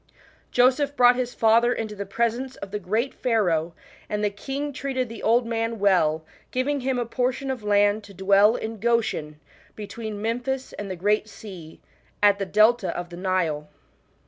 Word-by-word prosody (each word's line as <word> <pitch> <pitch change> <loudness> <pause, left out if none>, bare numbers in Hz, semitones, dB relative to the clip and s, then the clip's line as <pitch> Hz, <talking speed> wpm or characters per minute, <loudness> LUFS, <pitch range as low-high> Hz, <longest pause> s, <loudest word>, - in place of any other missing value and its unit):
Joseph 265 +3 +3
brought 245 -1 +6
his 245 -1 -3
father 230 +2 +4
into 220 -3 -3
the 200 -1 -6
presence 235 +5 -1
of 195 - -9
the 210 - -3
great 220 +7 -1
Pharaoh, 175 -9 0 0.3
and 210 0 -2
the 205 - +1
king 275 +8 -4
treated 260 -2 -2
the 230 - -8
old 235 +2 +3
man 230 0 -2
well, 165 -6 +2 0.2
giving 280 +3 -1
him 260 0 -1
a 240 - -1
portion 255 +3 -1
of 255 -3 -5
land 205 +1 +3
to 200 - -13
dwell 200 +4 +4
in 220 0 -5
Goshen 220 -10 0 0.4
between 215 0 -6
Memphis 245 +4 -3
and 205 -1 -6
the 185 - -3
Great 210 +4 0
Sea, 180 -9 -11 0.4
at 205 -1 +5
the 195 - -2
delta 215 +1 +4
of 175 0 -5
the 175 - -8
Nile. 170 -5 -1
220 Hz, 170 wpm, -24 LUFS, 200-245 Hz, 0.4 s, brought